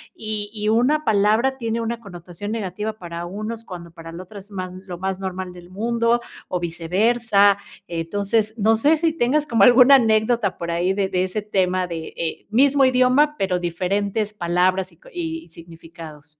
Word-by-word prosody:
y 215 -1 -3
y 210 -1 -1
una 295 +6 +2
palabra 220 +5 +2
tiene 230 -1 -2
una 230 0 -3
connotación 180 +1 -8
negativa 210 0 -3
para 170 -4 -7
unos, 215 +5 -6
cuando 175 -5 -9
para 165 0 -11
la 175 +2 -8
otra 200 +2 -11
es 200 +2 -16
más, 185 -2 -5
lo 180 -2 -7
más 190 +1 -3
normal 185 -1 -5
del 175 0 -13
mundo, 230 +4 0 0.3
o 180 - -1
viceversa. 200 +5 +2 0.3
Entonces, 200 +6 -1
no 220 +1 +3
sé, 295 +8 +3
si 320 0 +1
tengas 300 +1 +1
como 230 -6 +3
alguna 250 +4 +8
anécdota 220 -3 +2
por 170 0 -4
ahí 175 +3 +1
de 195 -1 0
de 180 0 0
ese 190 +3 -3
tema 185 -3 0
de 165 -1 -5
mismo 275 +5 +4
idioma, 260 +4 +3
pero, 185 -2 0
diferentes 200 +5 -2
palabras 185 0 0
y 165 - -23
con - - -18
y 330 - -5
significados. 165 -2 -13
200 Hz, 170 wpm, -22 LUFS, 180-230 Hz, 0.3 s, alguna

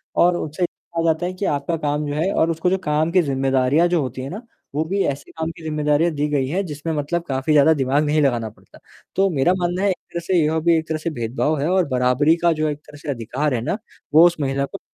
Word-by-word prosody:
और 175 0 +4
उनसे 155 +3 -3
ये - - +3
कहा 165 -1 -6
जाता 165 +1 +1
है 180 - -3
कि 185 +2 -4
आपका 145 +2 -1
काम 150 -1 -1
जो 145 - -3
है 165 +6 0
और 160 - +2
उसको 165 +2 0
जो 190 - +1
काम 155 +1 +1
की 185 +1 +4
ज़िम्मेदारियाँ 135 +2 +2
जो 175 -2 +1
होती 130 -1 -4
हैं 135 - -5
ना, 205 +5 -6 0.3
वो 155 - +1
भी 195 +4 -1
ऐसे 140 0 -4
काम 160 0 -4
की 165 - -14
ज़िम्मेदारियाँ 150 +1 +1
दी 145 0 -1
गई 140 -3 0
हैं 185 +8 -1
जिसमें 155 0 -4
मतलब 155 +3 -2
काफ़ी 135 +3 0
ज़्यादा 150 +2 +6
दिमाग 140 0 +1
नहीं 150 +1 +2
लगाना 120 -5 +1
पड़ता। 110 - -20 0.4
तो 195 0 +3
मेरा 165 +1 +2
मानना 175 +1 -1
है 200 - +3
एक 190 - +1 0.2
तरह 170 - -3
से 185 - +2
यह 160 +1 +1
भी 165 +1 +3
एक 160 - -3
तरह 160 - -1
से 155 +2 -3
भेदभाव 135 +3 -1
है 145 - 0
और 185 -1 +3
बराबरी 130 +4 +3
का 170 0 +4
जो 155 0 -1
एक 145 - -3
तरह 150 -1 -12
से 150 +1 -9
अधिकार 130 +3 -2
है 120 - -1
ना, 155 - -2 0.4
वो 160 +3 +8
उस 175 - -1
महिला 140 0 0
को 195 - -9
155 Hz, 265 wpm, -21 LUFS, 140-170 Hz, 0.4 s, वो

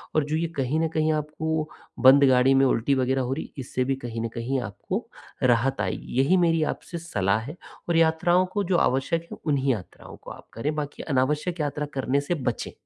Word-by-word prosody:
और 155 - +3
जो 150 +2 -2
ये 165 +1 0
कहीं 135 +3 0
न 165 - +2
कहीं 155 0 +2
आपको 155 +1 -2 0.3
बंद 135 +2 +7
गाड़ी 130 +1 +5
में 135 0 +5
उल्टी 130 +3 +1
वग़ैरह 130 0 +1
हो 130 +1 -1
रही, 145 - -6
इससे 130 -1 -2
भी 135 - 0
कहीं 120 -3 -6
न 115 - -1
कहीं 125 +3 -1
आपको 100 -4 -4 0.4
राहत 125 +1 +2
आएगी। - - -4
यही 175 +8 +3
मेरी 165 -2 +3
आपसे 170 - -9
सलाह 105 - 0
है 140 +8 -8 0.3
और 170 - +2
यात्राओं 165 +3 +3
को 205 +2 -2
जो 180 -1 +1
आवश्यक 150 +4 +1
है, - - -7
उन्हीं 140 -3 +1
यात्राओं 100 -5 -9
को - - -11
आप - - -12
करें, 145 +7 -2
बाकी 150 -1 -5
अनावश्यक 150 +5 0
यात्रा 150 0 -2
करने 135 +1 +1
से 170 +5 -2
बचें। 125 -5 -3
140 Hz, 205 wpm, -25 LUFS, 130-160 Hz, 0.4 s, बंद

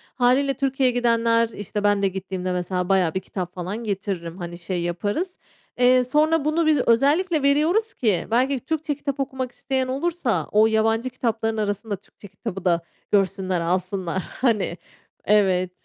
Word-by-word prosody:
Hâliyle, 265 +3 +3
Türkiye'ye 265 -2 +1
gidenler, 230 -1 +2
işte, 205 -1 -5
ben 205 -1 +3
de 195 - +3
gittiğimde, 185 -1 -4
mesela, 180 +1 -2
bayağı 185 -4 +3
bir 190 - 0
kitap 180 -2 -6
falan 185 +6 -4
getiririm, 190 -5 -4
hani, 175 -1 -6
şey 175 0 -3
yaparız. 205 - -2 0.4
Eee, 250 0 +5
sonra 300 +3 +2
bunu 315 +2 +1
biz 305 -3 +4
özellikle 295 +7 +3
veriyoruz 330 +11 +2
ki 210 -7 0
belki 260 +3 +2
Türkçe 310 +1 -2
kitap 280 -1 -4
okumak 260 -2 -3
isteyen 265 -1 -2
olursa 280 -1 -1
o 215 +1 +5
yabancı 225 +3 +1
kitapların 225 -3 -2
arasında 205 0 -2
Türkçe 205 +1 -16
kitabı 195 -1 -7
da 170 -1 +3 0.3
görsünler, 190 -2 +1
alsınlar. 185 +1 -1
Hani 210 -8 0 0.5
Evet. 185 -3 +3
225 Hz, 150 wpm, -23 LUFS, 190-265 Hz, 0.5 s, Eee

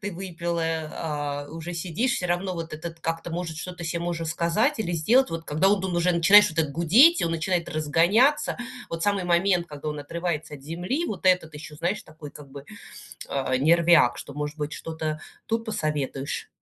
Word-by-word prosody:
ты 205 -1 -4
выпила, 170 -2 -3
а 150 -3 -3
уже 165 +2 -6
сидишь, 185 +9 -1
всё 180 - -2
равно 180 +2 -1
вот 165 -1 -6
этот 165 +2 -7
как-то, 165 +1 -3
может, 165 -1 -4
что-то 180 +2 -7
се 165 +1 -2
можно 170 -1 -3
сказать 170 - +1
или 175 -5 -2
сделать, 230 +12 +3
вот 165 0 -5
когда 155 +6 +2
он 200 -1 +2
уже 175 +1 +2
начинаешь 195 +5 +7
вот 160 - -12
так 155 -3 +1
гудеть, 220 - +6
и - - +1
он - - -1
начинает 170 +1 -1
разгоняться, 175 - +2 0.3
вот 165 0 -4
самый 200 -1 +1
момент, 175 0 +2
когда 150 -1 -7
он 150 0 -4
отрывается 155 0 -4
от 135 - -12
земли, 175 - -3
вот 190 -3 -4
этот 180 -4 +3
еще, 150 0 -9
знаешь, 175 +7 -2
такой 155 -1 -11
как 140 -2 -13
бы, 140 0 -10 0.6
э, 135 -1 -1
нервяк, 165 -1 +4
что, 140 - -9
может 150 +1 -4
быть, 150 0 -3
что-то 155 -1 -4 0.3
тут 225 0 -1
посоветуешь? 150 - -3
165 Hz, 190 wpm, -25 LUFS, 155-180 Hz, 0.6 s, начинаешь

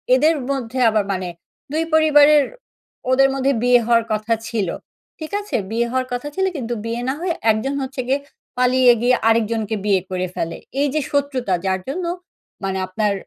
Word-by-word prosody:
এদের 310 +5 +3 0.2
মধ্যে 260 -2 -3
আবার 215 -2 +1
মানে 185 -2 -3 0.4
২ 315 +2 0
পরিবারের 300 -2 +6 0.7
ওদের 270 +1 +5
মধ্যে 270 0 +1
বিয়ে 245 0 +5
হওয়ার 230 0 +3
কথা 215 +2 0
ছিল। 215 -5 -1 0.5
ঠিক 315 +2 -7
আছে? 415 - -5 0.2
বিয়ে 235 +1 0
হওয়ার 255 0 -1
কথা 245 +4 -3
ছিল, 380 - +1
কিন্তু 240 -3 -3
বিয়ে 230 +1 -3
না - - +1
হয়ে 355 -1 0 0.2
একজন 220 +6 -1
হচ্ছে 265 0 -4
গিয়ে 270 +2 +2 0.4
পালিয়ে 250 0 +5
গিয়ে 245 +1 +4
আরেকজনকে 225 -1 +1
বিয়ে 195 -3 +3
করে 185 0 -2
ফেলে। 165 - -3 0.2
এইযে 290 +1 +1
শত্রুতা 270 -8 0
যার 190 0 +1
জন্য 345 +6 -3 0.6
মানে 190 0 -1
আপনার 205 +2 0
245 Hz, 165 wpm, -20 LUFS, 220-280 Hz, 0.7 s, পরিবারের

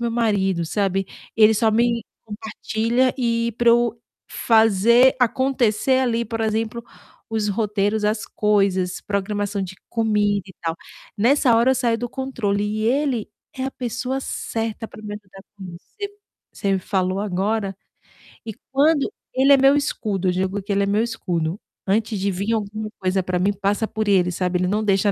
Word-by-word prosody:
meu 235 -1 -1
marido, 195 -7 +1
sabe. 195 0 0 0.3
Ele 220 0 +6
só 220 +1 +2
me 235 0 +1 0.2
compartilha, 220 +3 -1
e 235 -2 0
para 235 -1 +5
eu 235 -1 +2 0.3
fazer 225 +3 +4
acontecer 260 -1 +2
ali, 235 -2 +1
por 225 +1 -4
exemplo, 220 +1 -1 0.5
os 220 -2 -1
roteiros, 210 0 0
as 215 +1 0
coisas, 195 -3 +1
programação 205 0 -2
de 190 0 -6
comida 210 -3 +1
e 190 - -12
tal. 165 -1 -2 0.4
Nessa 245 +3 +4
hora 240 +3 +4
eu - - +3
saio 235 -2 +1
do 245 - -3
controle, 230 -7 -2
e 215 +1 -2
ele 260 -3 0 0.3
é 260 - -3
a 270 - -2
pessoa 250 +2 -3
certa 225 -3 -4
para - - -13
me 205 -1 -6
ajudar, 195 -2 -12
com 195 - -9
isso. 170 - -14
C 405 - -3 0.4
você 200 -2 -1
me - - +1
falou 185 0 -1
agora, 200 +1 -1 0.7
e 220 - -5 0.2
quando 290 +4 +3 0.2
ele 270 +2 +5
é - - +7
meu 270 +1 +5
escudo, 200 -10 -1
digo 190 +2 -1
que 200 - -6
ele 200 - +2
é - - +1
meu 210 +2 +2
escudo, 180 -6 -2 0.3
antes 215 +1 0
de 200 +1 0
vim 200 +5 -2
alguma 215 0 -3
coisa 190 0 +1
para 180 0 -1
mim, 200 +3 +2
passa 200 +2 -1
por 215 -1 -3
ele, 180 -2 +3
sabe. 180 0 -1
Ele 180 - +1
não 210 +3 0
deixa 200 0 +2
215 Hz, 170 wpm, -22 LUFS, 195-235 Hz, 0.7 s, é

